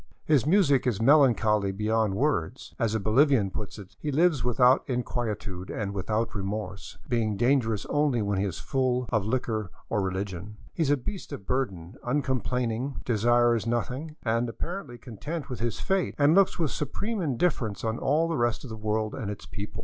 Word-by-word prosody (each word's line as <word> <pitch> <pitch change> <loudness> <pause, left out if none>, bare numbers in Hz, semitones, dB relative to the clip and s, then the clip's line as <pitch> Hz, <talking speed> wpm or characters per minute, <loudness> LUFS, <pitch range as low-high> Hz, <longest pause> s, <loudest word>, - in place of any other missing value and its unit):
His 145 -4 +3
music 155 -8 +4
is 110 -5 0
melancholy 115 -6 +4
beyond 105 0 0
words. 140 +1 -1
As 115 -3 +1
a - - +1
Bolivian 110 -1 +3
puts 105 +2 -6
it, 100 -2 -12
" - - -45
He 150 - -2
lives 155 -3 +3
without 125 +2 +4
inquietude 110 -7 -3
and 100 -2 -3
without 110 +4 -1
remorse, 100 -1 -5
being 110 -4 0
dangerous 120 -4 +2
only 145 -4 +1
when 100 -1 0
he - - +1
is 90 -4 -3
full 130 -3 0
or 110 - +3
liquor 110 -1 -2 0.2
or 105 - +1
religion. 95 +1 -4 0.2
He - - -3
is 150 - +2
a 145 - +4
beast 180 +10 -6
of 100 - -7
burden, 100 -6 -2
uncomplaining, 125 -1 -1
desires 120 0 +3
nothing, 125 +6 -2
is 115 +1 +1
apparently 170 -1 -6
content 140 - -6
with 125 - -4
his 115 -1 -2
fate, 190 -2 0
and 145 +1 +5
looks 195 +1 +4
with 160 -5 0
supreme 200 - -3
indifference 130 - 0
on 110 +1 -1
all 155 +4 +2
the 165 -2 -1
rest 120 -1 0
of 130 - -8
the - - -4
world 110 0 -1
and 115 -7 -4
its 105 - -6
people." 100 +1 -7
120 Hz, 180 wpm, -27 LUFS, 105-140 Hz, 0.2 s, and